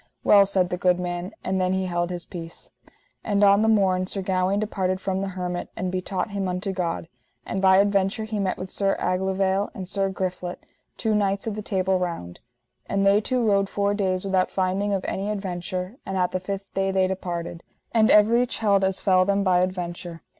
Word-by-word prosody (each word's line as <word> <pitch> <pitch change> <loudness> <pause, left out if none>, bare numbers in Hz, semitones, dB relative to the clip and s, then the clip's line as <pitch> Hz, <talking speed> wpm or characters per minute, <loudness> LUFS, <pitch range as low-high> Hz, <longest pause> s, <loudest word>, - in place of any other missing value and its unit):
Well, 200 -1 +6
said 185 -2 +1
the 180 - -1
good 180 0 +2
man, 175 +1 -4
and 190 0 0
then 185 0 +1
he 190 0 0
held 175 -1 -1
his 175 -1 -5
peace. 165 -2 -8 0.5
And 205 -1 +1
on 200 +1 +6
the 220 - +2
morn 190 -4 +3
Sir 195 0 -3
Gawaine 185 +1 +1
departed 190 -3 -1
from 190 0 -2
the 195 - -2
hermit, 180 -1 -4
and 185 0 -3
betaught 185 +3 -3
him 200 -1 -2
unto 180 +2 -2
God. 175 -3 -3 0.4
And 190 - -3
by 190 -1 +6
adventure 200 +1 +2
he 215 -1 -3
met 190 -2 -1
with 185 0 -6
Sir 195 -1 0
Aglovale 190 +1 0
and 185 -2 -6
Sir 195 0 0
Griflet, 180 -1 -4 0.3
two 220 - 0
knights 200 -1 +1
of 220 - -2
the 215 - -5
Table 190 -2 0
Round. 165 - -4 0.5
And 195 0 0
they 200 +1 +5
two 250 +2 0
rode 200 -2 +2
four 200 0 0
days 190 -2 -1
without 190 -1 +1
finding 190 +2 0
of 195 -2 -1
any 195 +2 -2
adventure, 185 +1 -4
and 190 0 -4
at 180 -1 +1
the 185 - -1
fifth 195 +1 -6
day 195 0 0
they 190 -1 +2
departed. 175 -3 -4 0.3
And 225 -1 +4
everych 235 +4 +4
held 200 -3 +2
as 190 0 0
fell 185 -2 +4
them 200 +1 +1
by 185 -2 +3
adventure. 175 -2 -3
190 Hz, 205 wpm, -24 LUFS, 185-200 Hz, 0.5 s, Well